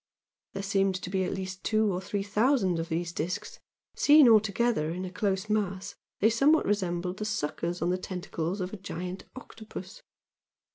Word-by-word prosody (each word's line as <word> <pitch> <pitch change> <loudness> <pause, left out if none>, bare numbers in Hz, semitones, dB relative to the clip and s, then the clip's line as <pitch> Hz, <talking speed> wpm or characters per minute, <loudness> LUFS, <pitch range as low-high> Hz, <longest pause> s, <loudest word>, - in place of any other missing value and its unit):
There 195 - -4
seemed 195 -1 +1
to 185 0 -5
be 190 -1 +1
at - - -2
least 190 -1 -5
two 215 -2 +2
or 180 - -2
three 195 +1 -3
thousand 205 -3 +2
of 165 - -4
these 170 +1 -2
discs 170 +3 -4 0.4
seen 295 -2 +7
all 225 -2 +8
together 215 -5 0
in 180 +3 -4
a 180 - -6
close 190 +1 -1
mass 200 -2 -1 0.3
they 215 - +6
somewhat 280 +7 +4
resembled 180 -2 -1
the 215 - -3
"suckers" 170 -3 -2
on 175 - +1
the 185 - 0
tentacles 180 0 -4
of 180 +2 -4
a - - -4
giant 185 -1 -6
octopus. 220 -6 -10
190 Hz, 180 wpm, -29 LUFS, 180-215 Hz, 0.4 s, all